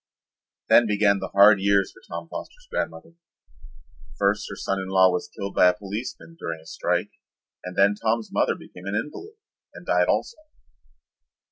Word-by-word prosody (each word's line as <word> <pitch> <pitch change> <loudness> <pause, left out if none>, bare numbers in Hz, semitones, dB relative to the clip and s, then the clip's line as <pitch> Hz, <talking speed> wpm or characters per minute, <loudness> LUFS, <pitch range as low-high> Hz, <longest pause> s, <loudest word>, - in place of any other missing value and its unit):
Then 120 - +6
began 100 -1 +2
the - - -4
hard 100 +1 +6
years 100 -1 +2
for - - -19
Tom 85 0 -6
Foster's - - -9
grandmother. 165 - -4 1.0
First 100 +1 +1
her 100 - -6
son 95 0 -2
in 95 - -5
law 95 -1 +5
was 90 - -2
killed 100 -2 -4
by 90 - +5
a 90 - +3
policeman 105 +10 -7
during 85 -1 -5
a 80 - -19
strike - - -2 0.5
and 90 0 -7
then 100 +1 +4
Tom's 110 +1 -1
mother - - +1
became 90 +1 -12
an 100 - -2
invalid 265 - -5 0.4
and - - -11
died - - +2
also. 470 - 0
100 Hz, 165 wpm, -24 LUFS, 95-110 Hz, 1.0 s, Then